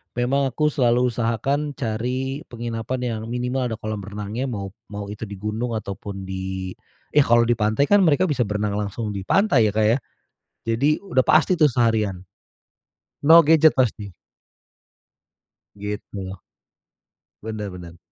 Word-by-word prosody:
memang 135 +3 +1
aku 150 +4 0
selalu 125 -1 +2
usahakan 135 +6 -1
cari 130 +4 -2
penginapan 120 +1 -4
yang 115 -3 -2
minimal 125 +1 -1
ada 115 - -3
kolam 110 -1 -5
renangnya 105 +6 -4
mau 100 -5 -5 0.2
mau 100 -1 -6
itu 105 +1 -6
di 100 - -7
gunung 110 +4 -3
ataupun 100 -1 -6
di 95 0 -4 0.4
yah 145 -1 +4
kalau 120 0 +5
di 115 -1 +1
pantai 110 - +1
kan 205 - +7
mereka 155 +4 +3
bisa 135 - 0
berenang 105 0 -1
langsung 105 +1 -3
di 100 - -4
pantai 145 - +4
ya, - - 0
Kak, 110 - +3
ya, 115 +4 +4 0.7
jadi 140 +7 +2
udah 130 -8 +2
pasti 155 +6 +4
tuh 155 -4 +4
seharian. 110 -6 +1 1.1
No 165 0 +9
gadget 160 0 +5
pasti. 105 -7 0 1.6
Gitu. 100 -2 -6 1.1
Bener 110 -2 -4
bener. 85 -1 -10
115 Hz, 140 wpm, -23 LUFS, 105-130 Hz, 1.6 s, No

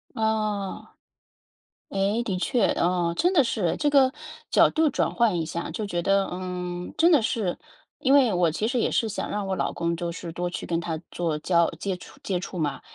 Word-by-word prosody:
哦。 215 -3 -1 1.0
诶， 200 +4 0
的 200 -5 -2
确， 240 +6 +2
哦， 175 -1 +1
真 355 - +2
的 325 -7 +5
是， 210 -8 0
这 295 - +2
个， 270 -2 +5 0.4
角 - - +5
度 315 -1 +3
转 - - 0
换 230 -7 +2
一 160 - -1
下， 170 +2 -4
就 210 +6 -3
觉 175 -4 -2
得， 195 +2 +2
嗯， 180 -1 -5
真 335 +2 +5
的 300 -6 +6
是。 215 -5 -1 0.4
因 275 -2 +3
为 270 -5 +5
我 175 -2 +2
其 210 +7 -1
实 245 +1 0
也 - - +1
是 225 - +1
想 210 - -4
让 205 -1 -2
我 190 - -1
老 - - -1
公 170 0 -1
就 170 0 -3
是 170 0 -7
多 175 +2 -3
去 175 - -5
跟 165 -1 0
他 165 -2 -3
做 165 -3 -2
交 170 +1 +2
接 195 -2 -2
触 - - -14
接 185 -3 -1
触 185 0 -7
嘛， 145 -3 -2
190 Hz, 220 characters per minute, -25 LUFS, 175-225 Hz, 1.0 s, 的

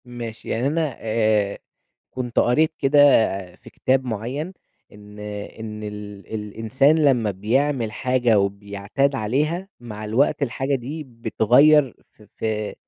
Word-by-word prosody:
ماشي، 120 -2 -8
يعني 120 +4 0
أنا 155 -3 -1
آآ، 110 -2 +1 0.5
كنت 125 -2 -3
قرأت 155 +6 +3
كده 140 +1 +2 0.6
في - - -15
كتاب 130 0 0
معيّن 125 - -4 0.4
إن 105 0 -14
إن 105 +1 -7
ال 105 -1 -8
الإنسان 115 +8 +1
لمّا 120 -7 +3
بيعمل 115 +4 0
حاجة 120 -2 +2
وبيعتاد 100 +7 -1
عليها، 150 - -1
مع 110 -3 -8
الوقت 140 +8 +1
الحاجة 135 +2 -1
دي 140 +5 -5
بتغيّر 125 +4 +3 0.2
في 105 - -20
في 110 -1 -2
115 Hz, 120 wpm, -22 LUFS, 105-135 Hz, 0.6 s, قرأت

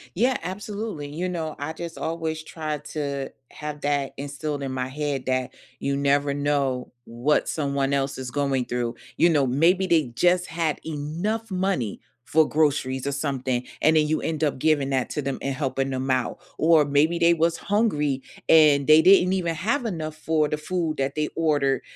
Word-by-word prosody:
Yeah, 250 +7 +2
absolutely. 205 -4 -5
You 165 +6 -3
know, 160 -3 -4
I 145 +2 -4
just 165 +1 -7
always 160 -1 -3
try 155 -1 -4
to 140 -2 -4 0.2
have 150 -1 -7
that 145 -2 0
instilled 145 +1 -4
in 135 -1 -3
my 130 -1 -2
head 140 -1 -3
that 130 -1 -1 0.3
you 140 0 -1
never 140 0 +2
know 140 -3 -1
what 120 +6 0
someone 140 -2 -1
else 140 0 0
is 130 -1 -5
going 135 -1 0
through, 120 -1 -2 0.2
you 170 - +5
know, 145 -5 +3
maybe 170 +9 +3
they 165 -5 +3
just 180 +5 +2
had 165 -2 -1
enough 170 +9 -3
money 185 - -1 0.3
for 160 0 +3
groceries 140 -4 +1
or - - 0
something. 130 -3 -2 0.2
And 155 +2 +4
then 155 -1 +4
you 155 +1 0
end 160 -1 -2
up 145 -4 0
giving 150 -2 +2
that 130 -2 0
to 150 - -2
them 135 -1 -3
and 140 - -2
helping 135 -1 -1
them 130 0 -3
out, 130 +5 -1 0.2
or 160 -1 +5
maybe 145 +4 +2
they 170 0 +5
was 165 0 +1
hungry 150 - 0 0.3
and 150 -3 +6
they 155 +1 +8
didn't 185 +1 +6
even 170 -3 -1
have 235 - -1
enough 160 -7 -4
for 155 -1 +1
the 150 - -1
food 160 0 -2
that 135 0 -1
they 150 0 -1
ordered, 145 -4 +1
150 Hz, 185 wpm, -24 LUFS, 140-165 Hz, 0.3 s, they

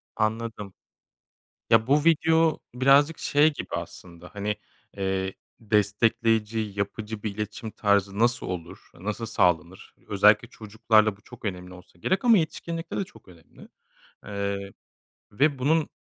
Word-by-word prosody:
Anladım. 110 -2 -2 1.0
Ya, 115 +1 +4
bu 145 +2 +3
video 160 0 +3
birazcık 140 +5 +4
şey 150 +2 +3
gibi 145 - -6
aslında, 90 0 -9
hani, 105 +1 -2 0.4
eee, 95 -1 -1 0.3
destekleyici 110 +1 +1 0.2
yapıcı 105 +1 -4
bir 100 -2 -3
iletişim 105 +1 -5
tarzı 100 -1 +1
nasıl 120 +1 +1
olur, 90 -3 -7
nasıl 105 +5 -5
sağlanır? 90 -3 0
Özellikle 105 +3 +4
çocuklarla 110 -1 +1
bu - - -25
çok 120 0 -13
önemli 90 -2 -5
olsa 90 -1 -16
gerek 190 - 0
ama 230 -3 +7
yetişkinlikte 165 +1 -3
de - - 0
çok 185 - -17
önemli. 85 -3 -17 0.6
Eee, 100 -1 -3 0.6
ve 140 +5 +1
bunun, 155 +4 +2
110 Hz, 125 wpm, -26 LUFS, 100-130 Hz, 1.0 s, ama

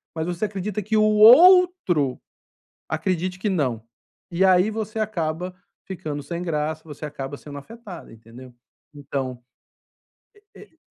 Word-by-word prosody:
mas 160 0 -2
você 180 +4 -2
acredita 205 +1 -4
que 215 +2 0
o 215 - +4
outro 225 - +5 0.7
acredite 180 +3 -2
que 210 - -2
não. 125 -10 -1 0.5
E 175 +3 +1
aí, 185 +3 +4
você 220 0 -5
acaba 180 -4 -3 0.3
ficando 150 -6 -6
sem 170 +5 -5
graça, 155 -2 -3
você 150 -1 -10
acaba 145 -1 -7
sendo 145 -1 -10
afetada, 205 +2 -11
entendeu? 115 +3 -14 0.4
Então, 135 -3 -5 1.1
e - - -14
e 370 -6 -17
175 Hz, 130 wpm, -23 LUFS, 145-210 Hz, 1.1 s, outro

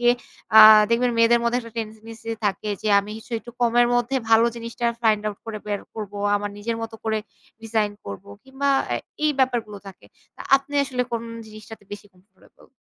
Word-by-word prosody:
গিয়ে 240 0 +5 0.4
অ্যা 220 0 +10 0.3
দেখবেন 245 +1 +2
মেয়েদের 235 +1 +5
মধ্যে 240 +1 +1
একটা 230 -1 -11
ট্রেন্ডেন্সি 225 0 -7
থাকে 205 +1 -1
যে 215 - -1
আমি 205 +1 -10
কিছু 225 - -14
একটু 240 - -12
কমের 240 0 +4
মধ্যে 245 +2 0
ভালো 225 +1 +6
জিনিসটা 230 +1 -4 0.2
ফাইন্ড 215 -2 +3
আউট 205 -1 -4
করে 215 -1 -5
বের 205 -1 -2
করব। 210 -2 -6 0.2
আমার 205 0 -4
নিজের 230 +2 -3
মতো 225 0 -6
করে 220 -1 0 0.4
ডিজাইন 220 -2 0
করব 100 -1 -8 0.2
কিংবা 270 +1 -3 0.2
এ্যা - - 0 0.3
এই 305 - +4
ব্যাপারগুলো 235 -6 0
থাকে। 195 -2 -13 0.3
তা - - -9
আপনি 275 +1 -9
আসলে 255 -2 -2
কোন 230 0 -2 0.2
জিনিসটাতে 215 -1 -12
বেশি 205 0 -9
কমফোর্টেবল? 190 +1 -24
225 Hz, 185 wpm, -23 LUFS, 210-240 Hz, 0.4 s, অ্যা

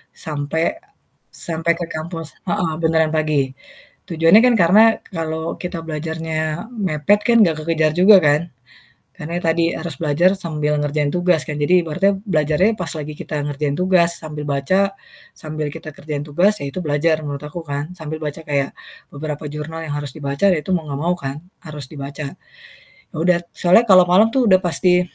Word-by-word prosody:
sampai 160 - -2 0.5
sampai 165 0 0
ke 170 - -2
kampus. 165 0 -5 0.2
Heeh, 175 -2 -1
beneran 160 -1 +3
pagi. 150 -3 +1 0.6
Tujuannya 165 +4 +5
kan 245 - +4
karena 185 +6 +6 0.2
kalau 160 -2 -4
kita 180 -1 -5
belajarnya 160 0 -4 0.4
mepet 195 - +1
kan 235 - +4
enggak 165 -5 +2
kekejar 155 -1 +1
juga 185 +6 +6
kan. 145 0 +4 0.8
Karena 160 +3 -6
itu 175 0 -3
tadi 165 +1 +1
harus 160 -4 -6
belajar 165 +3 +3
sambil 150 -4 -1
ngerjain 145 0 0
tugas 175 -2 +2
kan 150 -1 -5
jadi 175 +5 +3
ibaratnya 190 +5 0
belajarnya 180 +3 +1
pas 180 - -3
lagi 150 -1 -6
kita - - -7 0.2
ngerjain 145 0 -2
tugas 180 -1 +3
sambil 150 -1 -6
baca 185 +8 +1 0.4
sambil 155 -1 -5
kita 160 -1 -8
kerjain 145 -1 -6
tugas 175 +8 +1
ya 140 - -4
itu - - -7
belajar 155 -1 +1
menurut 145 0 -5
aku 160 +3 -8
kan. 145 +2 -4
Sambil 155 0 -6
baca 150 +2 -5
kayak 140 -2 0 0.4
beberapa 150 0 -6
jurnal 155 +2 -6
yang 160 - -6
harus 145 -3 -6
dibaca 140 +3 -1
ya 155 - -2
itu 190 - -7
mau 170 -4 0
nggak 140 -1 -4
mau 175 +1 +1
kan 140 0 -6 0.2
harus 150 -4 -7
dibaca. 140 -1 -6 0.8
Yaudah 170 +2 +1
soalnya 180 +6 +4
kalau 185 -2 +8
malam 190 +5 +4
tuh 250 +1 +1
udah 185 -3 +5
pasti, 180 0 +2
160 Hz, 170 wpm, -19 LUFS, 150-175 Hz, 0.8 s, kalau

